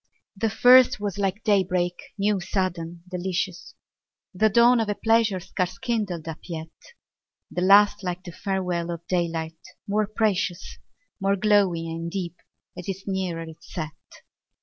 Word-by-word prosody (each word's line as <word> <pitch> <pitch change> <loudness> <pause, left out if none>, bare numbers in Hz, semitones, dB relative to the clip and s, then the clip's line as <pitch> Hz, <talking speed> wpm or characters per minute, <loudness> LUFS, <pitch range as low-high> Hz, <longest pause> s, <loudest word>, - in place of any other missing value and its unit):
The 225 +3 0
first 250 +1 +6
was 205 -1 -3
like 195 +1 -1
day 205 -3 +4
break, 180 -1 0 0.2
new, 205 0 +1
sudden, 175 -3 -3
delicious, 180 0 -3 0.6
The 215 +4 +3
dawn 235 +3 +5
of 220 -2 0
a 205 - 0
pleasure 225 -3 +2
scarce 185 0 -3
kindled 205 -9 -2
up 160 -1 -5
yet; 160 -2 -6 0.8
The 180 - -2
last 205 +2 +6
like 180 0 -3
the 175 - -8
farewell 180 -2 -2
of 170 0 -5
daylight, 165 -3 -2 0.3
more 210 +1 +1
precious, 210 -4 -1 0.4
More 195 0 +2
glowing 195 -4 +2
and 165 +1 -4
deep, 175 -2 -4 0.4
as 180 -1 -8
'tis 195 0 -4
nearer 185 -4 -2
its 160 0 -13
set. 155 -2 -4
185 Hz, 150 wpm, -25 LUFS, 170-205 Hz, 0.8 s, first